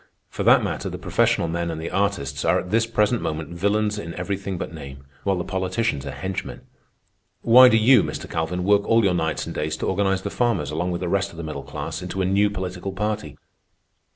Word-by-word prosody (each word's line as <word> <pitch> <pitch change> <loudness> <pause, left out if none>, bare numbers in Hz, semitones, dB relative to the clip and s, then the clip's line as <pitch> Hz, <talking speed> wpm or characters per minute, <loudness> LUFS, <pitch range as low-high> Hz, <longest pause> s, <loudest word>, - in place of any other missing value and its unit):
For - - -5
that - - +5
matter, - - -3
the - - -6
professional 85 - +1
men 85 +1 -2
and 80 -1 -4
the 80 - -5
artists 90 -9 -1
are - - +3
at 90 - -7
this 115 +1 +2
present 115 +1 +1
moment 80 +2 -4
villeins 105 +3 0
in 85 -4 -7
everything 95 +1 -3
but - - -5
name, 70 -3 -10 0.2
while 100 -1 +1
the 90 - -2
politicians 95 - -2
are - - -4
henchmen. 95 +3 -5 0.8
Why 125 +2 +8
do 115 - +4
you, 120 +1 +6
Mr. - - -5
Calvin, 80 +2 -2
work 100 +1 +4
all 115 0 +4
your 95 -2 +3
nights 80 -2 -1
and - - -6
days 75 0 -2
to - - -3
organize 95 0 0
the - - -3
farmers, 105 - 0
along 85 +4 -1
with 85 -1 -3
the 90 - -2
rest 100 +2 0
of 85 - -14
the 85 - -5
middle 75 -3 -5
class, 70 - -6
into 90 +1 -5
a 95 - +1
new 100 +2 +3
political 95 -1 -5
party? 105 +1 -3
95 Hz, 220 wpm, -23 LUFS, 85-105 Hz, 0.8 s, Why